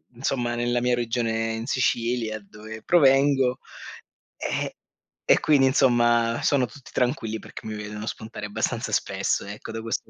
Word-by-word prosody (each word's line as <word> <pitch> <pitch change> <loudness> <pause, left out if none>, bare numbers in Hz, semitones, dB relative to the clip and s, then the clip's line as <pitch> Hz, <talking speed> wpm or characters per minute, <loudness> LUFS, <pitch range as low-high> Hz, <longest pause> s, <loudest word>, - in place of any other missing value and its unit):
insomma, 120 -1 -1
nella 120 0 0
mia 125 0 +2
regione 115 -1 -1
in 110 +1 -4
Sicilia, 115 -3 0
dove 110 +2 -10
provengo, 135 -4 +4 0.8
eh, - - -3 0.5
e - - +4
quindi, 140 -3 +4
insomma, 120 -3 +3
sono 135 -3 +3
tutti 125 +4 -14
tranquilli 115 -4 -1
perché - - -11
mi 110 -1 -4
vedono 105 +1 -6
spuntare 110 -1 -6
abbastanza 100 - -2
spesso - - 0
ecco 100 +2 -8
da 115 - -5
questo 115 0 -4
120 Hz, 145 wpm, -25 LUFS, 110-125 Hz, 0.8 s, provengo